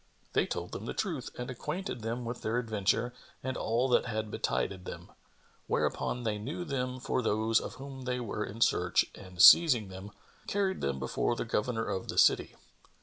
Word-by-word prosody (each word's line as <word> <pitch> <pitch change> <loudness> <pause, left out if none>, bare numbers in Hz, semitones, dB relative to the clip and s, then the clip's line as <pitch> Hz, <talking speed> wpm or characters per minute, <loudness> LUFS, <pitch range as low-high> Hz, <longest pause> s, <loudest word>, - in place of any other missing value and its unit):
They - - +2
told - - -4
them - - -6
the - - -4
truth 165 - -2
and 125 +1 -4
acquainted 150 - -4
them 115 +2 -3
with 120 +1 -5
their 110 +2 -1
adventure 115 +1 0 0.3
and 130 0 -2
all 120 +4 +1
that 125 - +3
had 110 -2 -3
betided 95 -2 -1
them; - - -8 0.6
whereupon 125 - -1
they 105 -2 -1
knew 145 +11 -4
them 130 -3 -2
for 125 - -1
those 110 0 +2
of - - -7
whom 135 -1 -8
they 125 0 -1
were 105 -2 -3
in 110 +2 -7
search 90 -5 +3
and 95 -3 -12
seizing 125 - +8
them, 95 +2 -8 0.4
carried 195 -1 0
them 70 -1 -1
before 65 - -1
the - - -3
Governor 115 0 -1
of 95 - -3
the - - -5
city. - - +4
115 Hz, 185 wpm, -31 LUFS, 105-130 Hz, 0.6 s, seizing